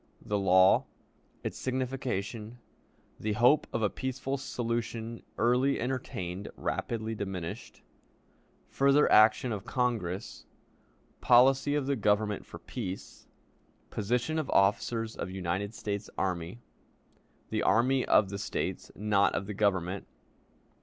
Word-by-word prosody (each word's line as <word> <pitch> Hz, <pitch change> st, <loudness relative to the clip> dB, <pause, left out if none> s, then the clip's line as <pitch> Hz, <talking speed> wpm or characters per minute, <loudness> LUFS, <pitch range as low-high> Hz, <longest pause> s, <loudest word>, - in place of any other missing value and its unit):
The 105 Hz, -1 st, 0 dB
Law. 95 Hz, -1 st, +5 dB, 0.6 s
Its -, -, -4 dB
Signification. 125 Hz, -4 st, -3 dB, 0.6 s
The 110 Hz, 0 st, -1 dB
Hope 125 Hz, +7 st, +4 dB
of 115 Hz, -, -1 dB
a 105 Hz, -, +3 dB
Peaceful 130 Hz, +1 st, -3 dB
Solution 115 Hz, -3 st, -3 dB, 0.2 s
early 125 Hz, +4 st, +2 dB
entertained; 100 Hz, -7 st, -4 dB
rapidly 110 Hz, -1 st, -2 dB
diminished. 95 Hz, -5 st, -6 dB, 0.9 s
Further 140 Hz, +2 st, +4 dB
Action 110 Hz, +3 st, +5 dB
of 105 Hz, -3 st, -4 dB
Congress. 110 Hz, -8 st, -2 dB, 0.7 s
Policy 135 Hz, +4 st, +5 dB
of 145 Hz, -2 st, 0 dB
the 140 Hz, +1 st, +1 dB
Government 105 Hz, -2 st, 0 dB
for -, -, -9 dB
Peace. 95 Hz, -6 st, -7 dB, 0.6 s
Position 120 Hz, +9 st, 0 dB
of 155 Hz, -, -3 dB
Officers 110 Hz, +3 st, +1 dB
of -, -, -4 dB
United 95 Hz, +3 st, -3 dB
States 105 Hz, 0 st, -4 dB
Army. 90 Hz, +1 st, -2 dB, 0.9 s
The -, -, 0 dB
Army 130 Hz, +3 st, +3 dB
of 100 Hz, -, +4 dB
the 100 Hz, -, -4 dB
States, -, -, -3 dB
not 100 Hz, -1 st, +2 dB
of -, -, -2 dB
the 105 Hz, -, -5 dB
Government. 95 Hz, -2 st, 0 dB
110 Hz, 115 wpm, -30 LUFS, 100-125 Hz, 0.9 s, Law